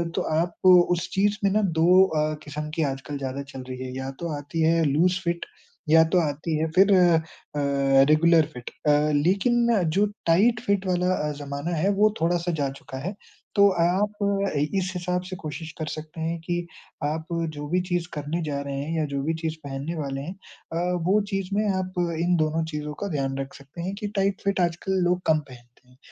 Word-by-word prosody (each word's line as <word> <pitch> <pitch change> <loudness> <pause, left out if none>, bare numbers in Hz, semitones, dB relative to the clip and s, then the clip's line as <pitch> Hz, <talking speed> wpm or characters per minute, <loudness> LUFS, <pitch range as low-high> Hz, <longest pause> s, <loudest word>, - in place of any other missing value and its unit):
तो - - +1
आप 170 +3 -1
उस 175 -1 +4
चीज़ 205 +2 +2
में 195 - +3
ना 215 +2 +2 0.2
2 180 +3 +7
अ, 155 -3 0
क़िस्म 150 +1 -5
की 160 - +1
आजकल 135 +2 -6
ज़्यादा 135 +1 -4
चल 130 -1 -7
रही 130 - -5
है, 130 0 -6
या 130 0 -4
तो 170 - -3
आती 155 +3 -4
है 165 +1 +3
लूज़ 170 +6 +2
फिट 170 0 -1 0.4
या 160 +1 +7
तो 180 - +6
आती 155 +2 -3
है 160 - +1
फिर 195 +2 +6
अ, 175 -3 +5 0.9
रेगुलर 165 0 +5
फिट। 125 -1 -8 0.2
अ, 150 +1 +4
लेकिन 235 +6 +3 0.3
जो 205 - +5 0.2
टाइट 210 +8 +4
फिट 200 -1 +1
वाला 180 0 +1
अ, 150 0 -2
ज़माना 145 +4 -3
है 180 +6 +2
वो 215 0 +5
थोड़ा-सा 175 +1 +1
जा 140 - 0
चुका 130 - -8
है। 195 - -4 0.4
तो, 200 0 +7
आप 185 +3 +1
अ, 200 0 +1
इस 185 +5 -1
हिसाब 180 0 -1
से 185 - -5
कोशिश 155 +1 -6
कर 155 - -3
सकते 155 +1 -8
हैं 165 +1 -2
कि 175 +1 -2 0.4
आप 155 +2 -2 0.3
जो 145 0 -5
भी 180 +3 +2
चीज़ 175 -1 0
करने 150 +3 -3
जा 145 -2 -2
रहे 140 -1 -5
हैं 160 +3 -3
या 155 - +1
जो 140 - -1
भी 160 +3 0
चीज़ 160 -1 -2
पहनने 140 +4 -4
वाले 140 -3 -3
हैं 160 +6 -6 0.4
अ, 175 +2 0
वो 205 +3 +4
चीज़ 195 -1 -2
में 210 +1 +1
आप 185 0 -4 0.3
इन 175 +1 +2
दोनों 155 +1 +1
चीज़ों 150 0 -4
का - - -1
ध्यान 135 0 -2
रख 135 0 -5
सकते 140 +5 -10
हैं 190 +3 -3
कि 210 - -3
टाइट 195 0 0
फिट 200 -1 +1
आजकल 175 +2 0
लोग 180 0 +1
कम 155 -1 +4
पहनते 130 -5 -13 0.2
हैं। 125 - -23
165 Hz, 205 wpm, -25 LUFS, 150-185 Hz, 0.9 s, 2